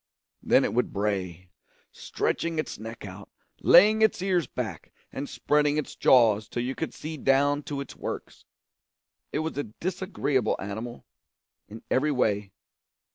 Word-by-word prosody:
Then - - +4
it - - -2
would 125 - +1
bray 95 -3 -3 0.4
stretching 165 -1 -2
its 155 - -3
neck 115 0 -8
out, 100 +1 -10 0.3
laying 215 +4 +7
its 220 - +3
ears 180 -3 +1
back, 105 -10 -6 0.2
and 140 +2 -5
spreading 150 0 +1
its 150 - -3
jaws 110 -4 +4
till 120 - -2
you 130 +2 -2
could 160 - -4
see 155 +1 -7
down 140 +2 +2
to 140 -1 -3
its 140 - -9
works. - - -7 0.9
It - - -2
was 160 -3 -3
a - - 0
disagreeable 145 - -1
animal, 110 +5 -6 0.6
in 110 +2 -11
every 145 +4 +2
way. 105 -7 0
130 Hz, 145 wpm, -27 LUFS, 105-150 Hz, 0.9 s, laying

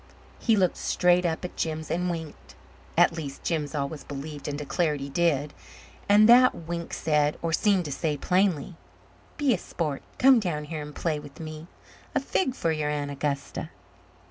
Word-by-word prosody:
He 225 - +3
looked 185 -4 +2
straight 180 0 +3
up 165 +2 -3
at 180 - -7
Jims 160 -1 -3
and 180 +1 0
winked. 160 -3 -7 0.4
At - - +6
least, 140 -4 -6
Jims 155 -3 -2
always 140 +1 -3
believed 145 +1 -7
and 145 -1 -3
declared 150 +1 0
he 140 +1 -5
did. 150 -2 +1 0.6
And 210 +1 +7
that 250 +2 +7
wink 170 0 -5
said, 150 -1 +1
or 165 -1 -1
seemed 195 -1 +3
to 145 - -4
say, 150 +1 -1
plainly: 180 0 +1 0.6
"Be 285 -4 +3
a 190 - -1
sport. 150 -6 -3 0.2
Come 260 -2 +6
down 170 -8 -2
here 155 0 -5
and 150 0 -8
play 155 -3 -1
with 145 0 -12
me. 155 0 -7 0.5
A - - +4
fig 260 -9 0
for 165 - 0
your 155 -2 -1
Aunt 145 -1 -2
Augusta!" 140 0 -3
160 Hz, 175 wpm, -27 LUFS, 150-180 Hz, 0.6 s, And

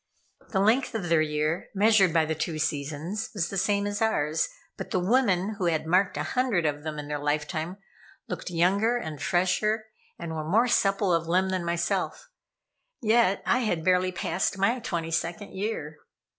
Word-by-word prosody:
The 195 - 0
length 225 +6 +2
of 185 -6 -3
their 165 -2 +4
year, 155 +2 -1
measured 205 -2 +5
by 160 -1 +3
the 160 - -1
two 160 +1 -3
seasons, 155 +7 -3
was 175 -4 -1
the - - -4
same 200 +1 +1
as 205 +1 -3
ours, 155 -8 +1 0.3
but - - -7
the 185 - 0
women 200 -1 +1
who 180 - +1
had 160 -2 0
marked 185 +4 +2
a - - -1
hundred 250 -10 0
of 145 -1 -1
them 155 0 -5
in 145 -1 -6
their 150 0 -3
lifetime, 155 +4 -2 0.5
looked - - -5
younger 195 +7 +2
and 155 - -6
fresher, 210 +5 +1 0.3
and 170 -1 -6
were 155 -1 -4
more 225 +7 +4
supple 195 -4 +2
of 165 -1 0
limb 185 +3 +2
than 185 -2 -1
myself, 170 - -2 0.7
yet 225 -4 +3
I 250 - +3
had 175 -9 -1
barely 185 0 +3
passed 185 +2 -1
my 230 +6 +2
twenty 165 -7 -3
second 175 +5 -3
year. 190 -7 -4
180 Hz, 180 wpm, -27 LUFS, 160-205 Hz, 0.7 s, measured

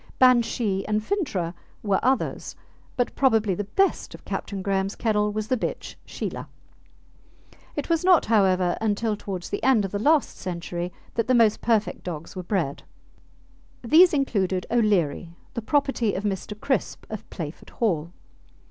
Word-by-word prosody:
Banshee 235 -5 +3
and 210 0 +1
Fintragh 210 - -2 0.3
were 200 -3 +2
others, 260 +2 0 0.4
but 245 - 0
probably 225 -7 +3
the 205 +3 -3
best 390 - 0
of - - -16
Captain 195 -2 -4
Graham's 195 0 0
kennel 210 -2 +1
was 215 0 -3
the 255 +1 +1
bitch - - -4
Sheelah. - - -5 1.3
It - - -3
was 330 0 +1
not, 365 -2 +5
however, 185 -5 +3
until 215 0 0
towards 190 -3 -6
the 205 - -3
end 245 -6 +4
of 195 - -5
the 205 - -2
last 295 +5 +2
century 175 -1 -4 0.2
that 230 -1 -1
the 255 - +4
most 225 -3 +4
perfect 220 -2 0
dogs 165 -1 -6
were 185 - -4
bred. 175 -7 -2 1.0
These 325 +9 +7
included 195 - 0
O'Leary, 180 -8 +1 0.2
the 235 - -3
property 270 -3 +1
of 195 - -3
Mr. 205 +1 -3
Crisp, 265 +3 -1
of 215 - -7
Playford 155 -2 -7
Hall. 170 -8 -1
210 Hz, 150 wpm, -25 LUFS, 190-240 Hz, 1.3 s, These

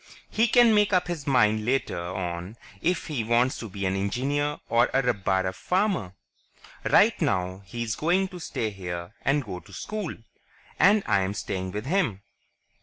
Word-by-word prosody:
He 225 +2 +3
can 240 -1 +6
make 210 -1 +3
up 180 -1 +3
his 165 -6 -4
mind 110 -5 +3
later 130 -5 0
on 90 +3 -5 0.2
if 180 0 0
he 140 -7 -2
wants 120 +3 +2
to 115 - -6
be 100 0 -4
an 95 +1 0
engineer 135 +9 -1
or 120 +1 +4
a 135 - +3
rabbara 95 -5 0
farmer. 180 - -1 0.7
Right - - +4
now, 95 0 0
he's 115 -2 -3
going 185 +4 +1
to 180 -2 -9
stay 115 -9 -3
here 90 -1 -6
and 140 -1 +1
go 95 -4 -6
to 85 - -18
school... 210 -5 -4 0.6
and 205 +2 +5
I'm 100 +1 +1
staying 95 -2 -4
with 105 +3 -4
him." 135 - 0
115 Hz, 165 wpm, -26 LUFS, -, 0.7 s, can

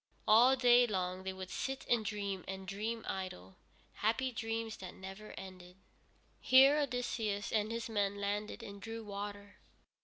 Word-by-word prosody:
All 240 +5 +7
day 245 -1 +6
long 185 -3 -2
they 190 - -3
would 190 -1 -8
sit 270 0 -3
and 235 -2 +3
dream 200 -3 -3
and 190 0 -6
dream 220 +4 -3
idle, 95 - -5 0.4
happy 230 +5 0
dreams 225 -1 -3
that 185 -1 -8
never 190 +3 -9
ended. 185 -1 -10 0.6
Here 270 +3 +7
Odysseus 240 -6 -1
and 215 0 +1
his 230 0 -3
men 205 -3 0
landed 205 +1 -3
and 200 0 -9
drew 225 +2 -6
water. 205 0 -7
210 Hz, 150 wpm, -34 LUFS, 190-230 Hz, 0.6 s, All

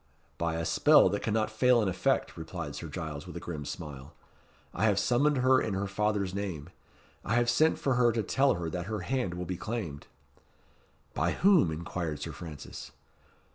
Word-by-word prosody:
"By 85 -1 0
a 80 0 -2
spell 95 - +5
that 100 +2 -2
cannot 110 0 0
fail 120 +3 +4
in 105 - +1
effect," 95 - 0
replied 80 -2 -6
Sir 85 - -6
Giles, 75 -2 -6
with - - -7
a - - -4
grim 75 -4 -6
smile. 70 -2 -8 0.6
"I 105 - 0
have 105 -3 +3
summoned 140 +7 +2
her 130 +1 +4
in 105 - -2
her 100 +1 -1
father's 100 -1 -1
name. 90 -5 -4 0.5
I 110 - 0
have 120 0 +3
sent 155 +7 +3
for 135 - 0
her 120 -1 +4
to 115 -1 0
tell 135 +4 +2
her 85 -1 -4
that 90 +2 -4
her 110 -2 -3
hand 120 -4 -2
will 90 0 -4
be 90 +1 -4
claimed." 95 -9 -5 1.1
"By - - 0
whom?" 185 - +4
inquired 80 -1 -4
Sir - - -5
Francis. 80 -4 -9
95 Hz, 185 wpm, -29 LUFS, 85-120 Hz, 1.1 s, spell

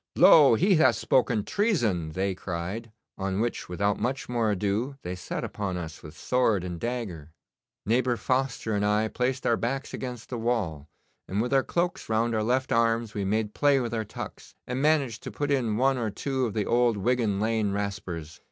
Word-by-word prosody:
"Lo, 160 -9 +8
he 185 - +4
hath 130 -6 +5
spoken 120 -4 +2
treason!" 110 - 0
they 95 +2 0
cried, 95 +5 -5 0.3
on 95 0 -1
which, 120 -4 -2
without 100 +3 0
much 130 +5 -2
more 120 -3 0
ado, 105 +7 -1
they 90 - -4
set 90 - -5
upon 95 -3 -3
us 80 -3 -7
with 75 -1 -11
sword 115 -7 +1
and 90 -2 -5
dagger. 100 -10 -4 0.6
Neighbour 120 +2 +2
Foster 130 -4 -1
and 105 0 0
I 105 +1 +2
placed 130 +3 -1
our 115 - +3
backs 135 +3 -3
against 125 -2 -6
a 120 - -3
wall, 95 -11 -1 0.4
and 100 - -2
with 120 +4 0
our 135 - +5
cloaks 175 +1 -2
round 115 +1 +1
our 110 - +1
left 130 +4 0
arms 115 -1 +2
we 100 - -2
made 105 +2 -1
play 145 -2 +3
with 120 -2 -3
our 110 -1 -1
tucks, - - -9
and 125 +1 -3
managed 140 -7 +2
to - - -7
put 145 0 -2
in 120 -6 +1
one 135 +1 +2
or 115 -2 -1
two 130 +3 -1
of 110 - -6
the 105 -2 0
old 120 -2 +2
Wigan 110 -2 +1
Lane 110 -1 +1
raspers. 95 -6 -4
115 Hz, 190 wpm, -27 LUFS, 100-125 Hz, 0.6 s, Lo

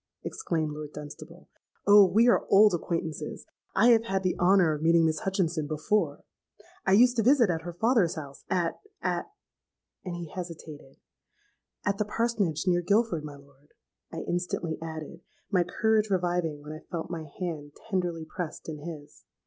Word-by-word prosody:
exclaimed 160 -3 -2
Lord 150 0 -7
Dunstable; 155 +4 -10 0.4
'Oh! 205 -1 +8
we 225 +6 +4
are 240 - +3
old 205 0 +6
acquaintances: 165 -2 -3 0.3
I 225 +5 +5
have 230 -1 +5
had 195 -3 -1
the 185 - +1
honour 180 -3 +4
of 150 - -5
meeting 165 0 +4
Miss 155 -1 +1
Hutchinson 175 -5 -1
before. 155 +8 0 0.6
I 190 - +5
used 245 +4 +5
to - - +4
visit 240 -4 +4
at 165 -1 -2
her 175 +1 -7
father's 220 -2 +2
house, 140 -3 -9
at—at—;' 290 - -2 0.7
and 180 -2 -5
he 175 -1 -6
hesitated.—'At 165 +4 -9
the 210 - +1
Parsonage, 210 -7 -1
near 175 -1 +3
Guilford, 200 -3 +1
my 150 -1 -8
lord,' 140 0 -21 0.4
I - - -5
instantly 175 -2 -2
added, 160 +1 -7 0.3
my 180 -3 +3
courage 215 +4 +1
reviving 175 -5 -1
when 150 - -8
I 155 - -8
felt 170 -1 -4
my 165 -2 -4
hand 155 -5 -4 0.2
tenderly 175 -4 -1
pressed 160 +1 -6
in 155 -2 -5
his. 150 -2 -9
175 Hz, 155 wpm, -28 LUFS, 155-200 Hz, 0.7 s, Oh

